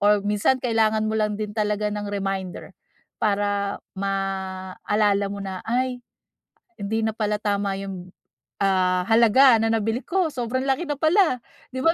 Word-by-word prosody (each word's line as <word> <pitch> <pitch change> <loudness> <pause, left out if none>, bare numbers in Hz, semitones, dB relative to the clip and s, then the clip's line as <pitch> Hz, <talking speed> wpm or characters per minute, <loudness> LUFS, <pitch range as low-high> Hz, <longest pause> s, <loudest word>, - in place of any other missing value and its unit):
or 205 0 +4
minsan 210 +5 +2
kailangan 220 -2 +2
mo 215 - -1
lang 210 -1 0
din 210 -1 -4
talaga 210 0 0
ng 205 0 -4
reminder, 195 -2 -4 0.5
para 205 -1 0 0.2
maalala 195 +1 -1
mo 200 - -6
na, 190 -2 -5
"Ay, 250 +1 0 0.8
hindi 220 +2 -2
na - - +1
pala 210 -1 -1
tama 200 -2 0
yung, 185 -2 -7 0.5
ah, 185 -2 +2
halaga 235 +3 +6
na 225 - +1
nabili 225 +2 0
ko, 360 -3 +1
sobrang 260 +1 -2
laki 275 +6 0
na 290 - -1
pala," 315 - +3 0.3
'di 260 - -3
ba 330 - +6
210 Hz, 150 wpm, -24 LUFS, 195-235 Hz, 0.8 s, halaga